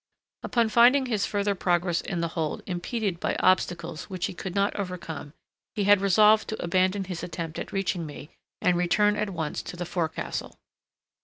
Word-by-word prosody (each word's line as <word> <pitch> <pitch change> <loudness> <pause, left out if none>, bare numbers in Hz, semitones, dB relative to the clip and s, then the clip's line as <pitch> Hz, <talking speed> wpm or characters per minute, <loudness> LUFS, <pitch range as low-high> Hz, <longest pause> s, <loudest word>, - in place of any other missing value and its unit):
Upon 235 -2 +1
finding 245 +4 +5
his 220 -5 0
further 205 0 0
progress 175 -2 +1
in 175 -3 -3
the 170 - -1
hold 160 -1 -3
impeded 185 +1 -2
by - - -1
obstacles 175 -3 +1
which 185 -3 -3
he - - -4
could 180 +1 -6
not 200 0 +1
overcome, 170 -7 -5 0.4
he 205 - 0
had 205 0 +5
resolved 210 +3 +5
to 220 - -4
abandon 185 +3 +1
his 180 -2 -5
attempt 165 -2 -5
at - - -6
reaching 185 -4 -1
me, 145 +1 -10 0.3
and 180 - +4
return 205 +4 +3
at 210 -1 -1
once 160 -5 -3
to 175 - -8
the 175 - -3
forecastle. 165 -2 -3
185 Hz, 175 wpm, -26 LUFS, 170-205 Hz, 0.4 s, finding